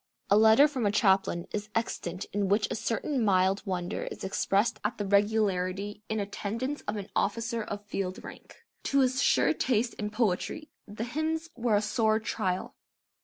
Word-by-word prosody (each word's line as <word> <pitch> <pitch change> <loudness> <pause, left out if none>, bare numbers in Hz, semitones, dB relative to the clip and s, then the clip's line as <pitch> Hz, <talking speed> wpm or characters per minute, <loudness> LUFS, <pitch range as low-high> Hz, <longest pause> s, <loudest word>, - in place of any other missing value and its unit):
A - - +7
letter 220 +6 +7
from 255 -7 -1
a - - +2
chaplain 195 -4 +2
is 210 0 -4
extant 185 -5 -2
in 200 -1 0
which 205 +2 +2
a - - -1
certain 240 +4 -1
mild 190 -1 +3
wonder 180 +1 -2
is - - -7
expressed 200 +3 +1
at 210 - -1
the 205 - -2
regularity 200 -1 +1
in 220 0 -1
attendance 225 +7 -3
of 210 - -1
an 200 -1 -7
officer 230 +2 0
of 205 -1 -6
field 195 -2 -4
rank. - - -12 0.2
To 275 - +3
his 260 +1 +2
sure - - +4
taste 240 -1 0
in 210 -1 -2
poetry 225 - -1 0.2
the 210 +2 -5
hymns 315 +6 -2
were 235 -3 +1
a 205 - +2
sore 220 0 +2
trial. 190 -4 -2
210 Hz, 170 wpm, -29 LUFS, 200-235 Hz, 0.2 s, A